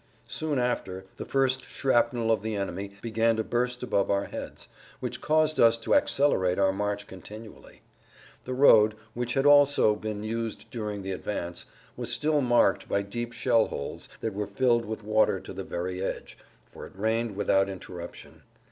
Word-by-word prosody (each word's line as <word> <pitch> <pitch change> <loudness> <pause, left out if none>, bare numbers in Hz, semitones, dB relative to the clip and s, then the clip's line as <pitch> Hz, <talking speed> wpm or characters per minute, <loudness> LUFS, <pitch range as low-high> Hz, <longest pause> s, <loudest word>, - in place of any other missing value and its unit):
Soon 155 -3 -1
after, 95 -7 -2
the - - -6
first 130 -1 +1
shrapnel 120 -3 +1
of 110 - +2
the 110 0 -3
enemy 100 0 -4
began 115 0 +2
to 110 - -1
burst 125 +2 -1
above 100 -5 0
our 100 0 +1
heads, - - -8 0.3
which - - -4
caused 155 0 +2
us 115 0 +6
to 115 - -1
accelerate 135 - +2
our 95 -1 +3
march 105 +1 -2
continually. 105 +4 -12 0.6
The 130 - -3
road, 110 -5 +6 0.2
which 120 +2 -2
had 135 +1 +1
also 145 -6 +6
been 105 -1 -5
used 115 -1 -4
during 105 -4 -4
the 95 - -4
advance, 90 -2 -4 0.3
was - - -4
still 150 -1 +1
marked 120 -2 +2
by 100 - +1
deep 120 +4 -5
shell 115 -1 +2
holes 70 - -6
that 110 - -2
were 105 0 -3
filled 120 +2 +2
with 110 0 -6
water 110 +1 +2
to - - -10
the - - -5
very 90 +1 -4
edge, 95 - -4 0.3
for - - -11
it - - -19
rained 110 +1 0
without 95 -1 +2
interruption. 90 -2 -9
110 Hz, 170 wpm, -27 LUFS, 100-125 Hz, 0.6 s, us